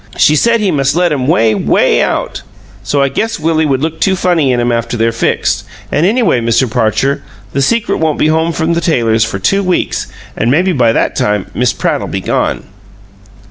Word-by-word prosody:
She 150 Hz, -, +4 dB
said 230 Hz, +7 st, +2 dB
he 200 Hz, -3 st, +1 dB
must 140 Hz, -2 st, 0 dB
let 175 Hz, -1 st, +2 dB
'em 130 Hz, -3 st, -2 dB
way, 115 Hz, -7 st, +3 dB
WAY -, -, +2 dB
out! -, -, -2 dB, 0.4 s
So 140 Hz, +8 st, 0 dB
I -, -, +2 dB
guess 225 Hz, +8 st, -2 dB
Willie 160 Hz, 0 st, +1 dB
would 135 Hz, 0 st, 0 dB
look 160 Hz, 0 st, -3 dB
too 190 Hz, -, +2 dB
funny 170 Hz, -7 st, +1 dB
in 125 Hz, -, 0 dB
'em 120 Hz, 0 st, 0 dB
after 115 Hz, 0 st, -2 dB
they're 115 Hz, +1 st, +1 dB
fixed; 115 Hz, -, -1 dB, 0.3 s
an' 160 Hz, -, +1 dB
anyway, 210 Hz, -, +2 dB
Mr. 115 Hz, +3 st, +1 dB
Parcher, 125 Hz, +4 st, 0 dB, 0.3 s
the 140 Hz, -, 0 dB
secret 230 Hz, +11 st, 0 dB
won't 160 Hz, -2 st, 0 dB
be -, -, +1 dB
home 160 Hz, +1 st, +1 dB
from 165 Hz, 0 st, -1 dB
the 170 Hz, -, -1 dB
tailor's 115 Hz, -9 st, +1 dB
for 110 Hz, -3 st, -3 dB
two 195 Hz, -, +1 dB
weeks, 185 Hz, -2 st, -1 dB, 0.3 s
an' 115 Hz, -, 0 dB
maybe 175 Hz, +8 st, +2 dB
by 125 Hz, -8 st, +2 dB
that -, -, 0 dB
time 105 Hz, -2 st, -1 dB
Miss 125 Hz, 0 st, +1 dB
Pratt'll -, -, -2 dB
be -, -, -3 dB
gone." -, -, -1 dB
140 Hz, 205 wpm, -13 LUFS, 115-170 Hz, 0.4 s, She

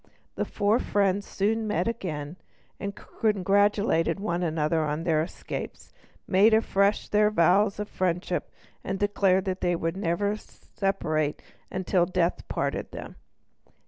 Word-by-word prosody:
The -, -, -2 dB
four 210 Hz, +3 st, +1 dB
friends 200 Hz, 0 st, +1 dB
soon 220 Hz, +2 st, 0 dB
met 180 Hz, -4 st, +1 dB
together 170 Hz, -9 st, -4 dB, 0.4 s
again, 200 Hz, -, -3 dB
congratulated 200 Hz, -4 st, +1 dB
one 175 Hz, -4 st, -1 dB
another 160 Hz, -1 st, +1 dB
on 150 Hz, +1 st, -2 dB
their 160 Hz, -3 st, +2 dB
escapes, 165 Hz, -, -6 dB, 0.3 s
made 210 Hz, +4 st, +5 dB
afresh 200 Hz, -2 st, +2 dB
their 210 Hz, 0 st, +3 dB
vows 195 Hz, +2 st, +3 dB
of 210 Hz, -, -3 dB
friendship, 180 Hz, -2 st, -1 dB, 0.3 s
and 190 Hz, -, -2 dB
declared 195 Hz, -2 st, +2 dB
that 190 Hz, -1 st, -3 dB
they 175 Hz, -1 st, +2 dB
would 165 Hz, +1 st, -2 dB
never 200 Hz, +2 st, 0 dB
separate 155 Hz, -9 st, -2 dB, 0.3 s
until 185 Hz, -1 st, +1 dB
death 180 Hz, -2 st, 0 dB
parted -, -, -2 dB
them. -, -, -8 dB
190 Hz, 130 wpm, -27 LUFS, 170-205 Hz, 0.4 s, made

